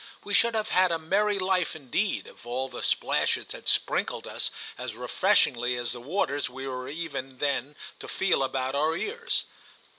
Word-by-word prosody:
We 205 - -4
should 235 +3 +4
have 220 0 0
had 185 -1 +4
a 165 - +2
merry 200 +6 +2
life 185 -3 +1
indeed 155 - -1
if - - -14
all 125 +3 -2
the 125 - -7
splashes - - +1
had - - -7
sprinkled - - +1
us - - -1 0.3
as - - -5
refreshingly 120 0 +2
as 120 0 -2
the 120 - -6
waters 145 -1 0
we 130 +2 -6
were 130 -1 -4
even 140 -4 -4
then 145 +1 -1 0.2
to - - -7
feel 190 -7 +2
about 130 0 0
our 155 +3 +2
ears. 475 +2 -1
150 Hz, 175 wpm, -28 LUFS, 130-190 Hz, 0.3 s, should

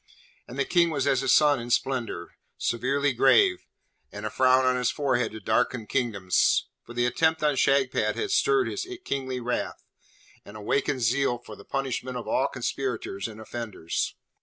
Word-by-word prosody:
And 125 - -9
the 140 - +1
King 175 -1 +3
was 140 -4 -1
as 135 -2 +2
a 135 - -1
sun 145 -1 +5
in 120 +1 -7
splendour, 120 -7 -1 0.2
severely 135 +4 0
grave, 120 -7 +4 0.4
and 105 +1 -7
a 110 - -3
frown 130 0 +4
on 130 0 +3
his 125 -1 +1
forehead 135 -4 0
to 110 - -7
darken 110 +2 0
kingdoms, 105 -8 +1 0.2
for 120 - -12
the 120 0 +2
attempt 160 +6 +1
on 150 -2 +3
Shagpat 135 -1 +2
had 415 -2 -2
stirred 405 -1 +3
his 380 -2 -4 0.2
kingly 130 -2 -2
wrath, 125 0 -3 0.6
and 100 +1 -11
awakened 135 +5 -1
zeal 120 +2 +1
for 110 -3 -12
the 100 - -15
punishment 130 -2 -3
of 120 - -7
all 135 - +2
conspirators 125 -6 -3
and 110 -1 -10
offenders. 110 -6 -4
130 Hz, 170 wpm, -26 LUFS, 115-140 Hz, 0.6 s, sun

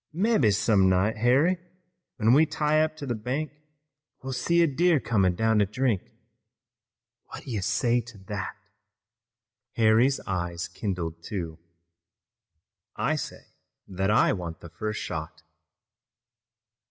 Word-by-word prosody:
Mebbe 185 - +3
some 100 -1 +3
night, 95 +4 +1
Harry, 135 +11 +3 0.6
when 115 0 +3
we 155 +4 +5
tie 155 0 +1
up 155 0 0
to 145 - -6
the 125 - -1
bank, 130 +7 -3 0.7
we'll 135 0 -4
see 170 +6 +2
a - - +5
deer 165 +2 +2
comin' 95 -8 +1
down 110 +2 +2
to 105 - +4
drink. 110 -1 0 1.3
What - - -9
do - - -8
you 105 -4 -2
say 120 +3 +1
to 115 -1 -13
that?" 100 -2 -4 1.2
Harry's 115 +4 +3
eyes 85 -2 -3
kindled, 85 -3 -4
too. 85 -3 -5 1.4
"I 135 +9 0
say 150 - -6 0.5
that 95 +1 -1
I 110 - +4
want 85 -4 -6
the 85 - -10
first 105 +5 -4
shot." 80 -1 -6
110 Hz, 130 wpm, -26 LUFS, 95-135 Hz, 1.4 s, we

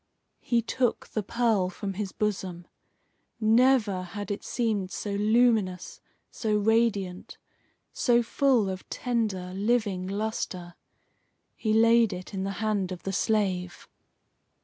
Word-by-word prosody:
He 235 -1 0
took 245 +1 -1
the 215 - -2
pearl 215 -3 +1
from 195 +2 -5
his 195 0 -4
bosom. 185 -4 -3 0.7
Never 225 -3 +3
had 205 +3 -6
it 205 - -4
seemed 215 -6 -1
so 205 - -4
luminous, 210 -3 +1 0.3
so 215 -2 0
radiant, 205 -4 0 0.6
so 240 -1 +3
full 245 -3 +2
of 185 -1 -6
tender, 210 -7 -2
living 200 -2 0
lustre. 195 -4 -3 0.8
He 215 - -2
laid 230 -1 +5
it 180 +3 -8
in 190 -1 -2
the 195 0 -2
hand 200 -4 0
of 180 - -7
the 195 - -3
slave. 190 -4 -1
210 Hz, 125 wpm, -27 LUFS, 185-230 Hz, 0.8 s, laid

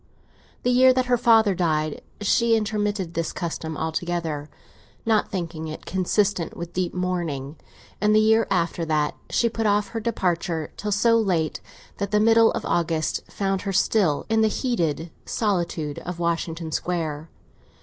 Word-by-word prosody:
The 250 - +2
year 255 +1 +6
that 255 0 +1
her 250 0 +3
father 225 -3 +4
died 155 -4 0 0.2
she 230 +3 +3
intermitted 210 -4 -1
this 165 0 -2
custom 160 -2 -4
altogether, 160 -2 -3 0.6
not 220 -2 +2
thinking 165 -4 -4
it 155 - -8
consistent 190 -1 0
with 170 0 -6
deep 180 -1 -1
mourning; 170 -6 -2 0.5
and 210 0 +4
the - - +6
year 220 +1 +4
after 175 -3 0
that 155 -2 0
she 235 - +2
put 225 -1 -1
off 205 0 +2
her 230 - -4
departure 175 -7 -1
till 210 - -4
so 230 +3 +4
late 175 -7 0 0.4
that 200 0 -1
the 210 +1 +2
middle 225 +1 +5
of - - -3
August 165 -2 0
found 195 -1 -1
her 195 -1 -3
still 190 -5 +2
in 225 0 +2
the 220 - +4
heated 170 - -1 0.2
solitude 170 -8 -1
of 180 -1 -6
Washington 165 -1 -2
Square. 160 -3 -2
180 Hz, 155 wpm, -24 LUFS, 165-215 Hz, 0.6 s, year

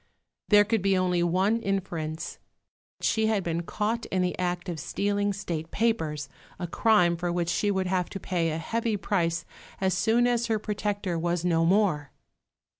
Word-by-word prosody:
There 205 -1 +7
could 220 0 0
be 195 0 +2
only 180 -1 +1
one 190 +6 +2
inference 170 -6 -3 0.6
she 220 -1 +2
had 215 -3 +1
been 170 0 -1
caught 215 +6 -2
in 185 -1 0
the 180 - -1
act 180 0 -1
of 170 -3 -4
stealing 205 +5 0
State 170 -5 -4
papers, 160 - 0 0.3
a 180 - -3
crime 175 -1 +3
for 175 +1 -2
which 175 -1 -1
she 175 +5 +1
would 190 -2 0
have 180 -1 0
to 195 - -6
pay 175 -3 0
a 160 - -2
heavy 225 +6 -1
price 170 -4 0 0.3
as 190 -1 +1
soon 225 +6 +3
as 240 -1 +1
her 225 -1 +1
protector 205 -4 -2
was 175 +1 -1
no 165 -2 +3
more! 170 -7 +2
185 Hz, 175 wpm, -27 LUFS, 170-210 Hz, 0.6 s, There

